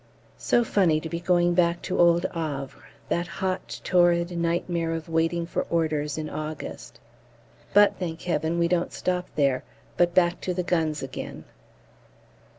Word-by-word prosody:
So 240 Hz, -, +2 dB
funny 180 Hz, -8 st, +2 dB
to 160 Hz, -, -6 dB
be 170 Hz, -, -3 dB
going 175 Hz, 0 st, +2 dB
back 170 Hz, -1 st, +2 dB
to 185 Hz, -, -2 dB
old 170 Hz, 0 st, +5 dB
Havre, 145 Hz, -5 st, -5 dB, 0.2 s
that 175 Hz, +1 st, 0 dB
hot 190 Hz, 0 st, -3 dB
torrid 175 Hz, -1 st, +3 dB
nightmare 170 Hz, 0 st, -1 dB
of 160 Hz, -1 st, -6 dB
Waiting 165 Hz, +1 st, 0 dB
for 170 Hz, -, -3 dB
Orders 155 Hz, -3 st, 0 dB
in 155 Hz, -1 st, -3 dB
August. 155 Hz, 0 st, -6 dB, 0.7 s
But, 205 Hz, 0 st, +5 dB
thank 165 Hz, -3 st, -4 dB
Heaven, 165 Hz, -1 st, 0 dB
we 170 Hz, 0 st, +3 dB
don't 175 Hz, 0 st, 0 dB
stop 180 Hz, -1 st, -1 dB
there, 140 Hz, -3 st, +2 dB, 0.3 s
but 175 Hz, -1 st, +2 dB
back 175 Hz, -1 st, +3 dB
to 180 Hz, -, -2 dB
the 180 Hz, -, -1 dB
guns 160 Hz, -4 st, 0 dB
again. 135 Hz, -, -7 dB
170 Hz, 155 wpm, -26 LUFS, 160-175 Hz, 0.7 s, old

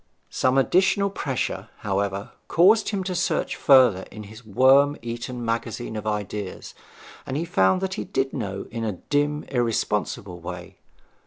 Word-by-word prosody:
Some 130 Hz, +1 st, +1 dB
additional 190 Hz, +7 st, +3 dB
pressure, 125 Hz, -, -3 dB
however, 100 Hz, -1 st, -2 dB, 0.2 s
caused 205 Hz, +6 st, +4 dB
him 200 Hz, -3 st, -2 dB
to 185 Hz, 0 st, -3 dB
search 175 Hz, 0 st, -1 dB
further 125 Hz, -9 st, +5 dB
in 110 Hz, -, -9 dB
his 110 Hz, +4 st, -12 dB
worm 135 Hz, +7 st, +4 dB
eaten 120 Hz, +1 st, -5 dB
magazine 115 Hz, 0 st, -3 dB
of 110 Hz, 0 st, -5 dB
ideas, 105 Hz, -2 st, -4 dB, 0.5 s
and 130 Hz, -, -4 dB
he 165 Hz, -, -1 dB
found 95 Hz, -, +2 dB
that 190 Hz, 0 st, -2 dB
he -, -, -3 dB
did 135 Hz, 0 st, -2 dB
know 100 Hz, -1 st, -4 dB
in 115 Hz, -, -4 dB
a 110 Hz, -2 st, -1 dB
dim 145 Hz, -, -1 dB
irresponsible 105 Hz, -6 st, -2 dB
way. 90 Hz, +1 st, -8 dB
120 Hz, 150 wpm, -24 LUFS, 100-145 Hz, 0.5 s, further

